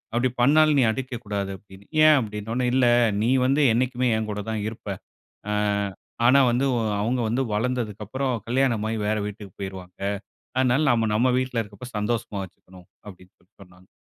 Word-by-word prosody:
"அப்டி 125 +2 +2
பண்ணாலும் 150 +2 +5
நீ - - +5
அடிக்கக்கூடாது", 110 -6 -4
அப்டின்னு. 95 +1 -17 0.2
"ஏன்?" 155 -1 +8
அப்டினோனே, 110 +3 -3
"இல்ல 130 -1 +4 0.4
நீ 115 - +1 0.2
வந்து 140 +3 +3
என்னைக்குமே 125 +1 +1
என் 110 -1 -3
கூட 105 0 -4
தான் 110 -1 -2
இருப்ப. 110 -1 -13 0.6
ஆ - - 0 0.7
ஆனா 135 +3 +6
வந்து 125 +3 +1
ஒ - - +1 0.2
அவங்க 120 +4 0
வந்து 125 +4 0
வளந்ததற்கு 110 -2 -2
அப்பறம் 130 +4 -2
கல்யாணமாகி 115 -3 0
வேற 110 0 +1
வீட்டிக்கு 105 -2 -8
போயிருவாங்க 95 -2 -8 0.6
அதனால 130 +2 +3
நாம 115 -2 +2
நம்ம 125 +3 +3
வீட்ல 130 -2 -1
இருக்கப்ப 105 +4 -11
சந்தோஷமா 105 -2 -2
வெச்சுக்கணும்" 90 -1 -16 0.2
அப்டின்னு 90 -1 -14
சொல்லி 90 +5 -33
சொன்னாங்க. 90 0 -18
115 Hz, 160 wpm, -24 LUFS, 105-125 Hz, 0.7 s, ஏன்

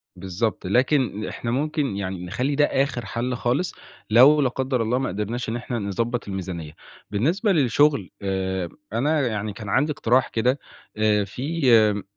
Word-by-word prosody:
بالضبط، 95 +4 -3
لكن 125 -1 +1
إحنا 115 - -4
ممكن 145 -2 -1
يعني 95 -2 -4
نخَلّي 130 +10 -1
ده 145 +1 +4
آخر 135 -5 -1
حل 120 +5 -2
خالص، 125 +9 -1 0.4
لو 135 +7 +7
لا 135 - +2
قدّر 130 0 -1
الله 115 +3 +1
ما 130 0 -1
قدرناش 105 +5 -3
إن 115 - -2
إحنا 120 0 -4
نضَبط 115 +4 -2
الميزانية. 90 -5 -5 0.4
بالنسبة 165 - +1
للشغل 140 - +3
آآ 95 -2 -2 0.2
أنا 140 +4 +1
يعني 110 -2 -3
كان 105 -1 -8
عندي 145 +9 +2
اقتراح 130 -2 +2
كده 125 +5 +1 0.4
آآ 105 -1 +3
في 115 - +2
120 Hz, 155 wpm, -23 LUFS, 100-135 Hz, 0.4 s, لو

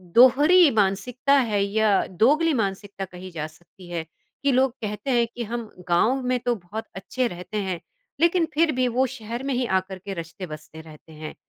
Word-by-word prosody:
दोहरी 290 +8 +7
मानसिकता 220 +7 +1 0.2
है 205 -1 +1
या 205 0 +2
दोगली 295 - +3
मानसिकता 200 -4 -2
कही 185 0 -10
जा 155 -3 -4
सकती 175 +3 -17
है, 170 -2 -3 0.4
कि 280 - +3
लोग 260 0 +3
कहते 210 +6 -3
हैं 240 -2 +3
कि 240 - -3
हम 230 0 -5 0.2
गाँव 225 +10 +3
में 250 0 +1
तो 245 0 0
बहुत 210 +3 -7
अच्छे 245 +6 -2
रहते 180 +2 -6
हैं 185 -3 -3 0.4
लेकिन 340 0 +4
फिर 320 +1 +3
भी 255 0 +2
वो 250 +2 +2
शहर 235 0 -6
में 275 0 -1
ही 250 0 0
आकर 190 -2 -1
के 195 +1 -6
रचते-बसते 165 -2 -8
रहते 160 0 -15
हैं? 155 0 -8
215 Hz, 185 wpm, -24 LUFS, 185-255 Hz, 0.4 s, दोहरी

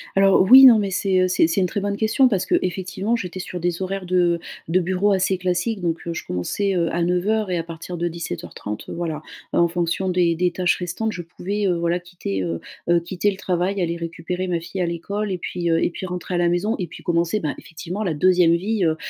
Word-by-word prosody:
Alors, 195 0 +5
oui. 265 +1 +11
Non, 235 -4 +9
mais 200 -2 -1
c'est, 185 -1 +1
heu, 185 - +3
c'est 180 -3 +3
c'est 180 +4 +1
une 180 - +2
très 200 - -3
bonne 200 0 -2
question, 225 +5 +3
parce 200 -7 0
que - - +2
effectivement, 190 +4 -2
j'étais 185 -4 -5
sur 180 -1 -5
des 175 +1 -2
horaires 190 0 -3
de 175 -1 +2 0.3
de 175 +3 +2
bureau 185 +3 +1
assez 190 0 +1
classiques. 185 +4 -1
Donc, 170 -1 -2
heu, 170 - -2
je - - -6
commençais, 190 - -1
heu, 170 -2 +1
à 170 - 0
09:00 185 +4 0
et 180 - +1
à 165 - -2
partir 170 +1 -7
de 175 - -1
17:30 105 - -6
heu, - - -5
voilà, 160 -3 -3 0.3
en 170 - +4
fonction 175 +2 -1
des 175 -2 +2
des 180 +1 +1
tâches 180 0 +1
restantes, 180 +5 -3
je 175 - -5
pouvais, 200 +4 -3
heu, 180 - +2
voilà, 170 +1 0
quitter 175 - -5
,heu, 85 -1 -3 0.3
heu, 175 0 +5
quitter 180 +4 -1
le 190 - -8
travail, 185 +1 -1
aller 170 -1 -1
récupérer 170 +2 -4
ma 175 -2 0
fille 185 +3 -5
à 180 - +2
l'école 200 +5 -3
et 185 - -1
puis, 175 0 -3
heu 165 0 +2
et - - +2
puis 180 - -7
rentrer 180 0 -4
à - - +1
la 175 0 +2
maison. 205 +6 0
Et 180 - -2
puis - - -12
commencer, 170 +4 +1
ben, 150 -5 -2
effectivement, 175 +5 -6
la 180 -6 0
2ème 175 +1 +4
vie, 195 +1 0
heu 160 -1 +2
180 Hz, 245 wpm, -22 LUFS, 170-195 Hz, 0.3 s, oui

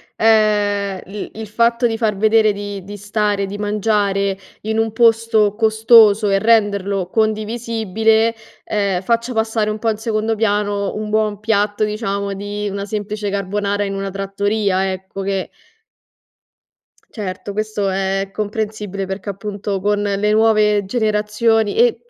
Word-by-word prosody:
ehm, 205 -3 +2
l 200 +2 -6
il 220 0 -7
fatto 235 +3 +2
di 225 -1 -2
far 220 -3 0
vedere 215 +1 +3
di 200 -1 -6
di 205 +2 -8
stare, 205 0 -1
di 200 +1 -6
mangiare, 205 -2 0 0.2
in 220 +1 -2
un 225 -1 0
posto 225 -2 +3
costoso 220 -1 +5
e 195 - +3
renderlo 200 -4 +1
condivisibile, 220 0 +1 0.3
ehm, 200 -3 -1
faccia 235 +4 0
passare 220 -1 0
un 215 - -5
po' 225 - 0
in 215 - -1
secondo 220 0 -1
piano 205 -2 0
un 215 0 -4
buon 215 -1 0
piatto, 210 -1 0
diciamo, 200 -2 -2
di 205 +1 -4
una 200 0 -4
semplice 210 0 -4
carbonara 200 +1 -1
in 195 -1 -3
una 195 0 -4
trattoria, 195 0 -1
ecco, 190 +1 -6
che 195 -1 -2 1.6
Certo, 200 -1 -6
questo 215 -1 -2
è 190 0 -1
è 195 0 -6
comprensibile, 210 -2 -3
perchè 190 +1 -5
appunto 200 0 -4
con 205 +2 0
le 205 +1 0
nuove 215 -2 +3
generazioni 215 0 +1
e 475 +1 +2
210 Hz, 140 wpm, -18 LUFS, 200-220 Hz, 1.6 s, costoso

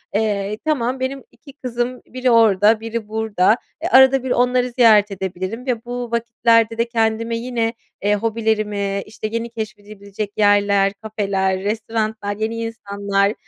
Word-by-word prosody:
eee, 210 -1 0
"Tamam, 260 -4 0
benim 265 +1 -3
2 280 -3 -16
kızım, 250 -2 -4
biri 255 0 -1
orada 220 -1 +5
biri 225 -1 -5
burada, 220 -1 +1 0.3
eee, 345 - 0
arada 265 -2 +6
bir 260 - -3
onları 250 0 +2
ziyaret 220 -4 +5
edebilirim 190 +5 -5
ve 240 -3 -2
bu 245 -1 -5
vakitlerde 230 -1 +2
de 230 +1 +1
kendime 230 0 0
yine, 230 -1 -2 0.3
eee, 205 +1 +2
hobilerimi, 210 -2 -1
işte, 215 0 -6
yeni 230 +1 -3
keşfedilebilecek 210 -2 -7
yerler, 200 -1 +3
kafeler, 200 -3 -1
restoranlar, 215 0 -2
yeni 220 +1 -2
insanlar, 200 -3 -1
220 Hz, 140 wpm, -20 LUFS, 205-235 Hz, 0.3 s, arada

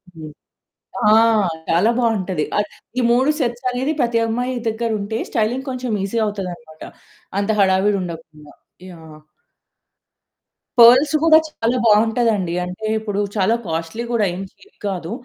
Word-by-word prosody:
హ్మ్. 155 -1 -9 0.8
ఆ! - - +6 0.6
చాలా 175 +7 +3
బావుంటది. 195 -9 0 0.5
ఈ - - +2
3 255 +4 +3
సెట్స్ 245 -2 -2
అనేది 260 +4 -1
ప్రతి 235 -1 +1
అమ్మాయి 245 +3 -2
దగ్గరుంటే 220 -1 -2
స్టైలింగ్ 240 +5 -1
కొంచెం 255 -2 -4
ఈజీ 200 +4 -3
అవుతదనమాట. 180 -6 -7 0.6
అంత 200 +1 -2
హడావిడి 195 +1 +2
ఉండకుండా. 160 -4 -9 0.4
యాహ్! 160 -3 -13 1.6
పర్ల్స్ 255 +6 +7
కూడా 315 -1 +7
చాలా 240 -4 -1
బావుంటదండి. 220 -4 +2
అంటే 180 +5 -7
ఇప్పుడు 205 -2 -4 0.2
చాలా 210 +2 +2
కాస్ట్లీ 165 +7 -4
కూడా 230 -3 +1
ఏం 185 - -6
చీప్ 410 - -24
కాదు. 180 -3 -4
215 Hz, 120 wpm, -19 LUFS, 180-240 Hz, 1.6 s, పర్ల్స్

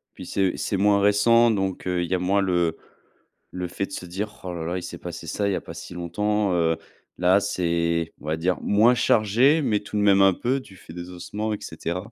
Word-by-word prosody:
Puis - - -9
c'est 95 -2 0
c'est 100 - -2
moins 100 +1 +3
récent, 115 +4 +4
donc 95 -4 -2
heu, 90 -1 0
il 85 - -4
y - - +2
a 90 - +1
moins 95 +3 +1
le 85 -4 +1 0.8
le 90 0 -4
fait 95 +3 -3
de - - -18
se 90 - -6
dire: 105 +4 -5
«Ouh 90 - -5
là 85 -2 -5
là, 85 +2 -2
il 90 - -5
s'est 85 -1 -7
passé 85 -1 -8
ça, 100 +5 -1
il - - +1
n'y 95 - 0
a - - -3
pas - - -10
si - - -9
longtemps». 105 +4 -1
Heu, 80 -2 +1 0.4
là, 90 +2 +4
c'est 85 -4 -1
on - - -14
va 80 +1 -1
dire 90 +2 0
moins 110 +4 +4
chargé, 120 +8 +3
mais 105 -6 +1
tout 105 +1 -6
de - - +1
même 100 -1 +5
un 95 -1 +6
peu, 130 +8 -1
du 100 -7 -14
fait 80 -2 -13
des 90 0 -7
ossements 105 +5 -4
et - - -2
cetera. 90 +7 -5
95 Hz, 250 wpm, -24 LUFS, 85-105 Hz, 0.8 s, un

